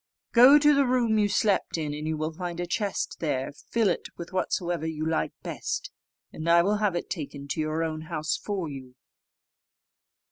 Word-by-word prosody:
Go 255 +5 +8
to 295 0 +5
the 280 -2 +3
room 235 -3 +2
you 205 -1 +2
slept 200 -3 +1
in, 150 -2 -2
and 150 +1 -5
you 160 0 -1
will 155 +1 -2
find 175 +1 -5
a 175 - -1
chest 200 +3 -2
there; 140 -5 -1
fill 225 +8 -1
it 175 - -1
with 170 +2 -8
whatsoever 175 -2 -1
you 155 -1 -3
like 160 0 0
best, - - -4 0.4
and 160 +2 -3
I 170 0 +6
will 205 +3 +2
have 205 -4 +1
it 175 - -3
taken 140 -4 -6
to 155 - -2
your 155 +1 0
own 155 -1 -3
house 155 0 -2
for 195 -5 -3
you." 130 -3 -9
170 Hz, 190 wpm, -27 LUFS, 155-205 Hz, 0.4 s, Go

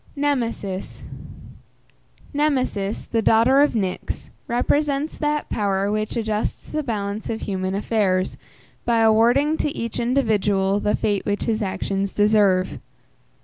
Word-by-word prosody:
NEMESIS. 235 -9 -2 1.3
Nemesis, 255 -9 0
the 230 - 0
daughter 230 +5 +4
of 290 - +3
Nyx, 190 -4 -3 0.2
represents 285 +4 0
that 300 -1 0
power 200 -1 0
which 215 0 -2
adjusts 220 -2 -2
the 305 - -1
balance 210 -5 -3
of 225 - -3
human 190 -1 -2
affairs, 195 -3 0 0.5
by 230 -1 +2
awarding 240 +8 +4
to - - 0
each 230 -1 -3
individual 205 -6 +1
the 210 - +1
fate 205 -2 0
which 205 0 -1
his 225 -1 -1
actions 195 0 -2
deserve. 205 -3 +3
220 Hz, 120 wpm, -22 LUFS, 200-255 Hz, 1.3 s, daughter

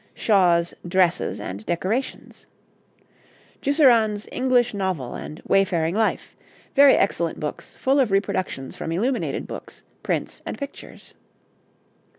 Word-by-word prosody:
Shaw's 175 -5 +3
'Dresses 180 -1 +1
and 100 +3 -6
Decorations.' 190 - -3 1.1
Jusserand's 235 -8 +3
'English 250 -2 +2
Novel' 185 -11 -2
and 155 - -8
'Wayfaring 175 -4 +2
Life.' 220 +2 -1 0.4
Very 280 -1 +7
excellent 170 -4 0
books, 150 -1 -6
full 270 +2 +2
of 255 -5 +3
reproductions 185 -8 -2
from 165 - -5
illuminated 240 +10 -1
books, - - -9 0.2
prints, - - -3
and - - -6
pictures. 280 -1 -9
195 Hz, 110 wpm, -23 LUFS, 170-245 Hz, 1.1 s, Very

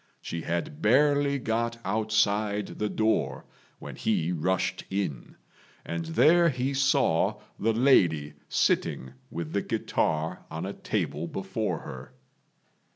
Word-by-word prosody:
She 85 - -5
had 85 -3 -3
barely 140 +4 +4
got 115 -1 -1
outside 105 -1 +1
the 105 - 0
door 110 +1 0 0.3
when - - -9
he 80 +3 0
rushed 90 +2 -1
in, 95 -11 -3 0.5
and 85 0 -3
there 165 - +5
he 130 0 -1
saw 135 -10 +2 0.2
the 115 +3 +2
lady 85 - +3 0.2
sitting 65 +1 0 0.2
with 85 -2 -5
the - - +1
guitar 80 +3 -1
on - - -4
a - - -4
table 80 +3 -2
before 95 +4 -3
her. 65 -1 -9
105 Hz, 120 wpm, -27 LUFS, 85-120 Hz, 0.5 s, there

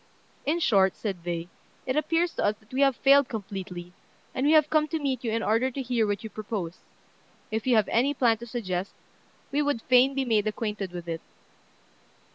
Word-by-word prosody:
"In 310 +4 +2
short," 195 - +3
said 190 -6 -5
they, 170 -1 -3 0.4
"it 255 - -1
appears 330 +3 +1
to - - -2
us 205 - +2
that 220 +3 -22
we 265 - +1
have 275 -2 +4
failed 275 0 +5
completely; 185 -5 -6 0.4
and 265 +2 0
we 305 - +5
have 305 -2 +6
come 305 -1 +3
to 320 - -2
meet 270 -5 -2
you 235 - -1
in 225 0 -1
order 230 +4 +2
to 265 - -7
hear 240 -3 +1
what 205 +1 -2
you 220 - -5
propose. 200 -5 -5 0.7
If 220 +3 -2
you 250 - +4
have 215 -3 +3
any 270 +5 +2
plan 230 -4 +3
to 235 - -8
suggest, 195 -6 -3 0.6
we 290 +2 +1
would 285 -6 -1
fain 255 +2 +4
be 270 -1 0
made 220 -3 +2
acquainted 210 -3 -3
with 175 -1 -7
it." 165 -1 -4
230 Hz, 205 wpm, -27 LUFS, 200-270 Hz, 0.7 s, have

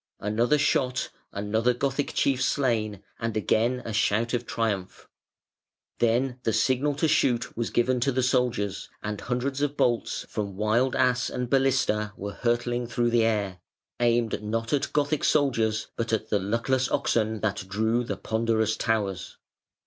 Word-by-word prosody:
Another 115 +8 +2
shot, 130 -3 +1 0.2
another 110 +4 0
Gothic 140 +2 -1
chief 135 -2 +2
slain, 110 -8 0 0.2
and 115 -1 -2
again 120 +4 +1
a 115 - -4
shout 110 +3 +1
of 120 -1 -1
triumph. 105 -5 -2 0.9
Then 120 +2 +1
the 115 - 0
signal 135 +5 +2
to 155 +3 +1
shoot 120 -5 +1
was 115 0 -2
given 125 +1 +1
to 135 +3 +1
the 130 0 0
soldiers, 120 -6 0
and 105 -1 -4
hundreds 130 +3 -2
of 145 0 -1
bolts 120 -2 0
from 100 -3 -4
Wild 115 +5 +2
Ass 125 -1 +2
and 125 -1 -4
Balista 130 -6 +2
were 100 +1 -5
hurtling 120 0 -1
through 120 0 0
the 115 -1 +4
air, 100 -5 -1 0.4
aimed 120 -3 +1
not 115 +3 -2
at 145 - 0
Gothic 145 0 0
soldiers, 115 -7 +1
but 115 0 -2
at 110 0 -1
the 105 - +3
luckless 115 +6 0
oxen 110 -1 0
that 100 -3 -2
drew 110 +4 +1
the 120 - -4
ponderous 110 -1 0
towers. 100 -5 -2
115 Hz, 155 wpm, -26 LUFS, 110-125 Hz, 0.9 s, the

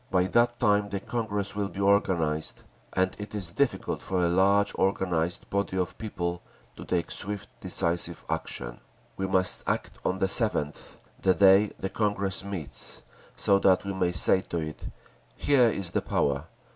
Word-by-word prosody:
By 90 -1 +3
that 120 +5 +2
time 105 -3 +2
the 100 - -3
Congress 105 -3 -3
will 100 -1 -1
be 95 - -9
organised, 90 -6 +1 0.3
and 95 0 +1
it 105 +1 -7
is 95 -5 -4
difficult 140 +7 -1
for 90 -2 0
a - - +2
large 100 +3 +3
organised 90 -3 -1
body 100 -1 -1
of 90 -2 -1
people 90 -5 -3 0.3
to - - -9
take 85 -2 -1
swift, 100 +1 -3
decisive 85 0 -1
action. - - -4 0.4
We 95 - -2
must 95 -1 +2
act - - -2
on 95 - 0
the 95 - +1
7th, 95 - +1 0.3
the 95 -1 +3
day 100 +1 +5
the 95 - -3
Congress 100 -3 0
meets, 95 -8 -3 0.3
so 100 0 +3
that 95 0 +3
we 100 - -3
may 90 -2 0
say 90 +2 +4
to 85 - -5
it, 80 -2 -5 0.5
'Here 130 -5 +4
is 95 -5 -3
the - - 0
power! 70 +1 0
95 Hz, 165 wpm, -27 LUFS, 90-100 Hz, 0.5 s, day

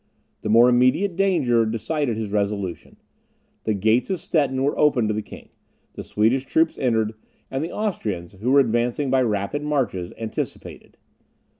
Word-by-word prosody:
The - - -4
more 115 +3 +6
immediate 130 +10 +3
danger 160 -12 +2
decided 115 +3 -2
his 110 -2 -4
resolution. 100 -3 -3 0.7
The 110 - +1
gates 110 - +2
of 190 -3 -1
Stettin 140 -5 0
were 140 - +1
opened 125 -7 +3
to - - +1
the 110 - -2
king; - - -13 0.4
the - - -7
Swedish 115 +5 +1
troops 160 +3 +2
entered; 110 -4 +1 0.4
and 135 +2 -2
the 165 - -4
Austrians, 105 - -3
who 115 +5 -1
were 140 +1 +6
advancing 120 +3 0
by 135 -1 +3
rapid 105 +4 -1
marches, 135 -12 -1
anticipated. 110 -1 -6
120 Hz, 155 wpm, -23 LUFS, 110-145 Hz, 0.7 s, more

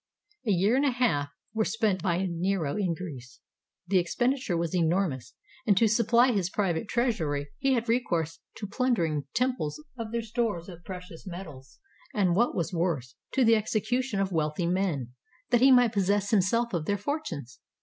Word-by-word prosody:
A - - +3
year 195 +5 +3
and 275 - +2
a 285 - +4
half 235 - +1 0.2
were 220 -1 +1
spent 215 -4 0
by 180 +1 0
Nero 170 -3 -1
in 185 -5 0
Greece. 135 -9 -9 0.5
The 185 +1 +3
expenditure 240 +2 0
was 170 +1 -2
enormous, 165 -7 0 0.3
and 200 -3 +4
to 225 - +5
supply 235 +3 +4
his 195 -6 0
private 190 -1 -1
treasury 160 - 0
he 270 0 +2
had 235 -1 0
recourse 175 -10 0 0.2
to 210 - -6
plundering 195 - 0
temples 250 - 0 0.2
of 225 -1 -4
their 235 0 -1
stores 220 -6 -2
of 175 -1 -11
precious 180 -1 -9
metal, 170 -7 -8 0.5
and 185 -5 +2
what 235 +5 +2
was 175 +2 -2
worse, 160 -8 -1 0.2
to 260 - +3
the 225 0 +6
execution 220 +2 0
of 195 -1 0
wealthy 155 +1 0
men, 170 -9 -1 0.4
that 240 -1 +4
he 265 +1 +7
might 245 -3 +5
possess 200 0 +1
himself 230 +3 +2
of 165 -3 -1
their 205 +3 0
fortunes. 190 - -4
195 Hz, 170 wpm, -28 LUFS, 170-230 Hz, 0.5 s, he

